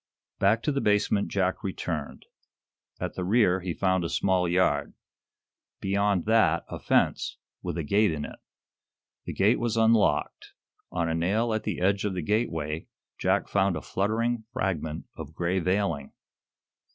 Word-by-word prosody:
Back 110 Hz, +4 st, +3 dB
to 150 Hz, -, +1 dB
the 140 Hz, -1 st, -1 dB
basement 105 Hz, -1 st, +2 dB
Jack 95 Hz, 0 st, -1 dB
returned. 80 Hz, -6 st, -4 dB, 0.7 s
At -, -, -3 dB
the 90 Hz, -, -4 dB
rear 95 Hz, -2 st, +3 dB
he 90 Hz, -2 st, -4 dB
found 95 Hz, -2 st, +1 dB
a 85 Hz, -, -2 dB
small 90 Hz, -2 st, +1 dB
yard. 80 Hz, -5 st, +1 dB, 0.8 s
Beyond 100 Hz, -1 st, +1 dB
that 110 Hz, -7 st, +3 dB
a -, -, -6 dB
fence, -, -, +1 dB, 0.2 s
with -, -, -4 dB
a 85 Hz, -, -1 dB
gate 100 Hz, +6 st, +3 dB
in 75 Hz, -2 st, -3 dB
it. -, -, -10 dB, 0.9 s
The -, -, -4 dB
gate 105 Hz, +5 st, +3 dB
was 120 Hz, -1 st, -1 dB
unlocked. 110 Hz, -2 st, +2 dB, 0.4 s
On 85 Hz, -2 st, -1 dB
a 80 Hz, -, 0 dB
nail 105 Hz, +8 st, +1 dB
at 110 Hz, 0 st, -2 dB
the 105 Hz, -, -2 dB
edge 100 Hz, +2 st, +2 dB
of 100 Hz, -3 st, -1 dB
the 90 Hz, -, -3 dB
gateway 80 Hz, -7 st, -1 dB, 0.3 s
Jack -, -, +1 dB
found 100 Hz, -2 st, +2 dB
a 75 Hz, -, -4 dB
fluttering 110 Hz, +3 st, -1 dB
fragment 85 Hz, -, -2 dB
of 80 Hz, -1 st, -9 dB
gray 90 Hz, +2 st, 0 dB
veiling. 90 Hz, -6 st, -1 dB
95 Hz, 155 wpm, -27 LUFS, 85-105 Hz, 0.9 s, Back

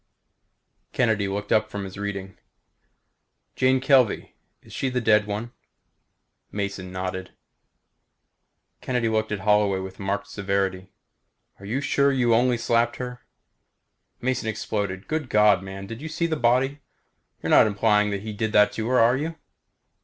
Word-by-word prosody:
Kennedy 110 Hz, -5 st, +1 dB
looked 100 Hz, +1 st, -4 dB
up 110 Hz, 0 st, +3 dB
from 100 Hz, -1 st, -5 dB
his 95 Hz, -1 st, -8 dB
reading. 100 Hz, -1 st, -5 dB, 1.2 s
"Jane 130 Hz, 0 st, +3 dB
Kelvey 130 Hz, -4 st, +2 dB, 0.3 s
she 135 Hz, -, -3 dB
is 130 Hz, -, -3 dB
the 125 Hz, -, +1 dB
dead 105 Hz, -2 st, +3 dB
one?" 105 Hz, +3 st, -4 dB, 1.0 s
Mason 100 Hz, -2 st, -4 dB
nodded. 95 Hz, 0 st, -5 dB, 1.5 s
Kennedy 125 Hz, -3 st, 0 dB
looked 110 Hz, 0 st, 0 dB
at 105 Hz, -2 st, -2 dB
Holloway 105 Hz, -1 st, +3 dB
with 95 Hz, 0 st, -7 dB
marked 100 Hz, +1 st, -2 dB
severity. 95 Hz, -2 st, -2 dB, 0.7 s
"Are 100 Hz, -, -11 dB
you 125 Hz, +7 st, -1 dB
sure 140 Hz, 0 st, +2 dB
you 125 Hz, -3 st, +2 dB
only 120 Hz, +1 st, +3 dB
slapped 115 Hz, 0 st, +1 dB
her?" 125 Hz, -1 st, -6 dB, 1.0 s
Mason 125 Hz, -2 st, -1 dB
exploded. 100 Hz, -3 st, -3 dB
"Good 155 Hz, -4 st, -2 dB
God, 105 Hz, -3 st, +4 dB
man. 95 Hz, 0 st, -8 dB
Did 115 Hz, +5 st, -8 dB
you 160 Hz, -, -6 dB
see 165 Hz, +2 st, -1 dB
the 165 Hz, -1 st, 0 dB
body? 130 Hz, +2 st, +1 dB, 0.6 s
You're -, -, -1 dB
not -, -, +7 dB
implying 105 Hz, 0 st, +2 dB
he 105 Hz, +2 st, -4 dB
did 110 Hz, +1 st, -2 dB
that 105 Hz, 0 st, +5 dB
to 110 Hz, 0 st, -4 dB
her, 130 Hz, +1 st, +2 dB
are 115 Hz, +2 st, +5 dB
you?" 160 Hz, +4 st, -3 dB
105 Hz, 145 wpm, -24 LUFS, 100-125 Hz, 1.5 s, not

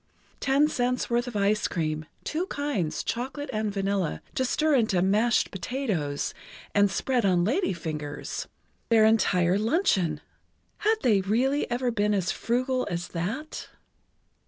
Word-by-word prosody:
Ten 280 Hz, +2 st, +3 dB
cents' 250 Hz, -4 st, -1 dB
worth 240 Hz, +1 st, +1 dB
of 245 Hz, -, -6 dB
ice 205 Hz, +1 st, +2 dB
cream, 155 Hz, -2 st, -2 dB, 0.2 s
two 340 Hz, +5 st, -2 dB
kinds, 280 Hz, -, -2 dB
chocolate 265 Hz, +4 st, -4 dB
and 215 Hz, -1 st, -1 dB
vanilla, 195 Hz, -4 st, -1 dB
to 260 Hz, -, 0 dB
stir 305 Hz, +4 st, +1 dB
into 220 Hz, -8 st, +3 dB
"mashed 210 Hz, +6 st, +2 dB
potatoes" 190 Hz, -, -2 dB, 0.4 s
and 205 Hz, 0 st, +4 dB
spread 250 Hz, +3 st, 0 dB
on 180 Hz, -3 st, +3 dB
lady 300 Hz, -, +1 dB
fingers! 155 Hz, -4 st, -5 dB, 0.4 s
Their 225 Hz, -2 st, +6 dB
entire 190 Hz, -4 st, +3 dB
luncheon! 205 Hz, -, +1 dB, 0.6 s
Had 435 Hz, +1 st, +3 dB
they 210 Hz, -6 st, +4 dB
really 250 Hz, +9 st, +1 dB
ever 245 Hz, 0 st, 0 dB
been 210 Hz, -1 st, +1 dB
as 190 Hz, -1 st, 0 dB
frugal 255 Hz, +2 st, -1 dB
as 175 Hz, 0 st, -3 dB
that? 210 Hz, -, -4 dB
215 Hz, 135 wpm, -27 LUFS, 185-260 Hz, 0.6 s, Their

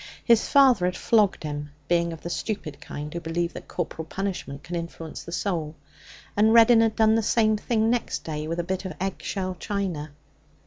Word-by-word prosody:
His 230 Hz, -2 st, +4 dB
father 260 Hz, -9 st, +5 dB
had 180 Hz, 0 st, -1 dB
flogged 210 Hz, -7 st, +2 dB
him, 145 Hz, -1 st, -4 dB, 0.2 s
being 170 Hz, -1 st, +2 dB
of 165 Hz, -, -8 dB
the 170 Hz, -, -5 dB
stupid 170 Hz, -8 st, -4 dB
kind 150 Hz, +1 st, -7 dB
who 170 Hz, -, -3 dB
believe 170 Hz, +1 st, -2 dB
that -, -, -9 dB
corporal 165 Hz, -2 st, -4 dB
punishment 175 Hz, -7 st, -4 dB
can 175 Hz, -, -5 dB
influence 165 Hz, -1 st, -6 dB
the 170 Hz, -, -9 dB
soul. 165 Hz, -5 st, -2 dB, 0.6 s
And 215 Hz, +2 st, +4 dB
Reddin 230 Hz, 0 st, +7 dB
had 225 Hz, -1 st, +2 dB
done 220 Hz, 0 st, +4 dB
the 225 Hz, -, +3 dB
same 220 Hz, 0 st, +3 dB
thing 220 Hz, +1 st, +1 dB
next 245 Hz, -2 st, -1 dB
day 155 Hz, -1 st, -4 dB
with 165 Hz, +2 st, -3 dB
a -, -, 0 dB
bit 185 Hz, +2 st, -3 dB
of 185 Hz, -4 st, -5 dB
egg 190 Hz, +1 st, -3 dB
shell 185 Hz, -2 st, -3 dB
china. 185 Hz, -7 st, -3 dB
180 Hz, 195 wpm, -25 LUFS, 165-215 Hz, 0.6 s, Reddin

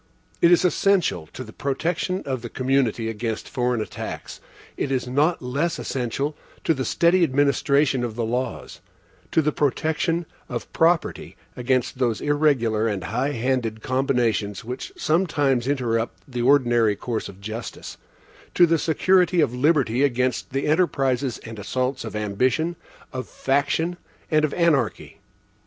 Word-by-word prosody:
It 170 Hz, -, +6 dB
is 175 Hz, +1 st, +5 dB
essential 180 Hz, -, +2 dB
to 130 Hz, -, -8 dB
the 110 Hz, -3 st, -12 dB
protection 170 Hz, +7 st, -2 dB
of 130 Hz, -3 st, -2 dB
the 120 Hz, -, -6 dB
community 130 Hz, -3 st, 0 dB
against 115 Hz, 0 st, -3 dB
foreign 125 Hz, -2 st, 0 dB
attacks; -, -, -6 dB, 0.3 s
it 135 Hz, -, -2 dB
is 130 Hz, -1 st, -1 dB
not 145 Hz, +5 st, +1 dB
less 145 Hz, +7 st, -1 dB
essential 135 Hz, +4 st, -2 dB, 0.3 s
to 165 Hz, -, +3 dB
the 130 Hz, -3 st, -3 dB
steady 175 Hz, +1 st, +3 dB
administration 140 Hz, -2 st, +2 dB
of 115 Hz, -3 st, -3 dB
the 115 Hz, -1 st, -1 dB
laws; 125 Hz, +3 st, -3 dB, 0.5 s
to 160 Hz, -, +3 dB
the 150 Hz, -, +2 dB
protection 160 Hz, +4 st, 0 dB, 0.2 s
of 120 Hz, -1 st, -5 dB
property 165 Hz, 0 st, +1 dB, 0.2 s
against 125 Hz, 0 st, 0 dB
those 120 Hz, -4 st, +1 dB
irregular 135 Hz, -7 st, +2 dB
and 100 Hz, -5 st, -2 dB
high 125 Hz, +9 st, -1 dB
handed 115 Hz, -3 st, -1 dB
combinations 120 Hz, -6 st, 0 dB
which 125 Hz, -, -6 dB
sometimes 145 Hz, -, +1 dB
interrupt 120 Hz, -5 st, -1 dB
the 125 Hz, -3 st, -4 dB
ordinary 120 Hz, -5 st, +4 dB
course 115 Hz, +1 st, -4 dB
of 95 Hz, -, -13 dB
justice; 110 Hz, +4 st, -7 dB, 0.6 s
to 175 Hz, -, +7 dB
the 165 Hz, -1 st, +2 dB
security 180 Hz, +3 st, +3 dB
of 145 Hz, -6 st, +2 dB
liberty 130 Hz, -3 st, +2 dB
against 130 Hz, -3 st, +1 dB
the 135 Hz, +1 st, -2 dB
enterprises 135 Hz, -6 st, +1 dB
and 110 Hz, -1 st, -8 dB
assaults 130 Hz, +6 st, -2 dB
of 110 Hz, -2 st, -6 dB
ambition, 130 Hz, +11 st, 0 dB, 0.4 s
of 130 Hz, -1 st, -5 dB
faction, 145 Hz, +6 st, 0 dB, 0.3 s
and 155 Hz, 0 st, +4 dB
of 145 Hz, -, -4 dB
anarchy. 155 Hz, -9 st, 0 dB
130 Hz, 145 wpm, -23 LUFS, 120-155 Hz, 0.6 s, to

